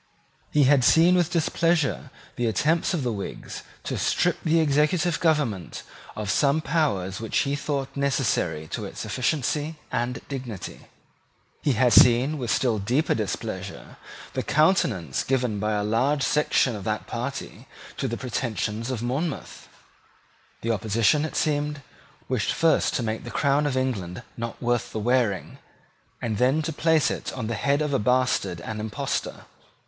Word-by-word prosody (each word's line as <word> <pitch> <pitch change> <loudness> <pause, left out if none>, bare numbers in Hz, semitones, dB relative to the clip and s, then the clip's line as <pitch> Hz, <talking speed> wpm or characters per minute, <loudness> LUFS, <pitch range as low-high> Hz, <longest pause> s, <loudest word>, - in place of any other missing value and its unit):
He 150 - +3
had 135 -1 +5
seen 165 +7 +6
with 175 -2 +3
displeasure 165 -3 +1 0.3
the 120 - 0
attempts 155 - +1
of 155 - -2
the 120 - 0
Whigs 100 -2 -6 0.2
to - - -3
strip 175 -1 +1
the 165 0 +3
executive 160 +3 +2
government 145 - 0 0.3
of 105 -2 -2
some 140 +8 +3
powers 130 - 0
which 115 -1 -2
he 140 0 0
thought 140 -2 -3
necessary 125 - 0
to - - -4
its - - -6
efficiency 150 +4 -1 0.2
and 120 +1 -1
dignity. 125 -9 -7 0.7
He 145 - +2
had 125 +1 +3
seen 125 +5 +6
with 120 -3 -3
still 115 -5 +1
deeper 125 +10 +1
displeasure 105 -4 -5 0.4
the - - -1
countenance 140 - +2
given 125 -5 0
by 105 +1 0
a 105 -1 0
large 130 +7 +1
section 145 -4 +2
of 100 - -7
that 105 -1 -2
party - - -5 0.3
to - - -1
the 115 - -3
pretensions 115 -2 -3
of 120 -3 -3
Monmouth. 135 +6 -3 0.9
The 115 - 0
opposition, 110 +7 +2
it 155 - -6
seemed, 150 -1 0 0.4
wished 125 -6 0
first 165 -3 +2
to 120 - 0
make 110 0 -3
the - - -7
crown 145 +1 +2
of 135 -2 -1
England 100 -10 -2
not 115 -1 -5
worth 120 -1 0
the 110 - -2
wearing, 115 -4 0 0.6
and 110 -3 -2
then 135 +5 +3
to 160 +1 -3
place 160 0 +2
it - - -4
on 125 -4 -4
the 115 - -2
head 140 +6 +1
of 150 -1 -2
a 135 - +2
bastard 105 -7 +1
and 110 +3 -5
impostor. 105 0 -3
130 Hz, 155 wpm, -25 LUFS, 110-150 Hz, 0.9 s, seen